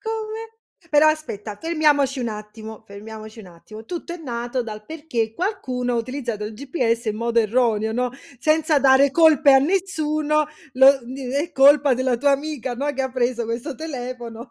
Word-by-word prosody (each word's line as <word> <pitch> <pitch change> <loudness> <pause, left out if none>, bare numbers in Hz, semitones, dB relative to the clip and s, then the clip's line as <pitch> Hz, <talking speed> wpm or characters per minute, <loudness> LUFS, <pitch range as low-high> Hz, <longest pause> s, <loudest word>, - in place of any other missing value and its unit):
come? 445 0 -6 0.3
Però 300 +1 +5
aspetta, 220 -10 -3
fermiamoci 295 -5 +1
un 235 - -2
attimo, 215 +1 -9
fermiamoci 215 +2 -10
un 195 - -13
attimo. 215 +6 -13
Tutto 345 -1 -6
è 350 - -7
nato 245 -3 -3
dal 215 -2 -8
perché 265 -8 -3
qualcuno 255 - -2
ha - - 0
utilizzato 235 -3 -4
il 210 - -6
GPS 240 -2 -2
in 215 - -1
modo 235 +1 0
erroneo, 220 -1 +1
no, 250 +1 -1 0.3
senza 310 +2 +2
dare 270 +1 +5
colpe 305 -2 +5
a - - +8
nessuno, 305 -3 0 0.3
lo 265 +1 +7
d 250 +3 -8
è 295 +6 -2
colpa 285 0 +5
della 255 -1 0
tua 280 +2 +3
amica, 275 -3 -3
no, 285 +4 -2
che 270 - -4
ha 265 - 0
preso 245 -1 -1
questo 240 +6 -4
telefono, 245 -5 -7
260 Hz, 170 wpm, -22 LUFS, 230-305 Hz, 0.3 s, a